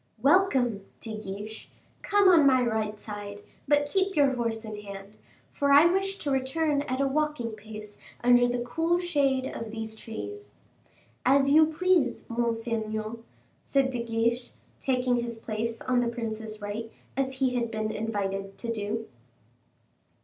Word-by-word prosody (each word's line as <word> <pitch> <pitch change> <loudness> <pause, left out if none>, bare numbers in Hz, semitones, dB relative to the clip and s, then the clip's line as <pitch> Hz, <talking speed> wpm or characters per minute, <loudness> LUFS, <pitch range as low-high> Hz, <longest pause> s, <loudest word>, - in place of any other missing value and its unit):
"Welcome, 265 - +3 0.2
De 220 -2 -6
Guiche, 210 +1 -7 0.3
come 405 -1 +4
on 330 -6 +7
my 260 -2 +5
right 220 -2 -1
side, 205 -1 -7 0.2
but 290 0 +4
keep 385 +5 0
your 280 -3 +4
horse 230 -2 -2
in 215 -1 -6
hand, 200 0 -9 0.4
for 280 0 +1
I 285 +3 +8
wish 390 +3 +1
to 290 - -3
return 280 +3 +1
at 260 -2 -3
a 275 - +3
walking 295 -4 0
pace 215 -1 -10 0.2
under 245 0 +6
the 245 0 -1
cool 325 +8 +1
shade 285 -7 +1
of 230 -3 -5
these 220 0 -5
trees." 405 - -7 0.7
"As 275 +2 +4
you 310 +1 +7
please, 325 -4 +1
monseigneur," 225 -1 -2 0.4
said 270 -1 +1
De 245 -2 -2
Guiche, 235 +1 -1 0.3
taking 250 -2 +1
his 235 -1 -3
place 225 +1 -4
on 250 -1 +2
the 245 - +1
prince's 220 -2 -5
right 220 +2 -4 0.2
as 265 0 0
he 260 -1 0
had 240 -2 0
been 215 -1 -2
invited 195 -3 -3
to 230 -1 -3
do. 220 +1 -3
240 Hz, 150 wpm, -28 LUFS, 220-280 Hz, 0.7 s, I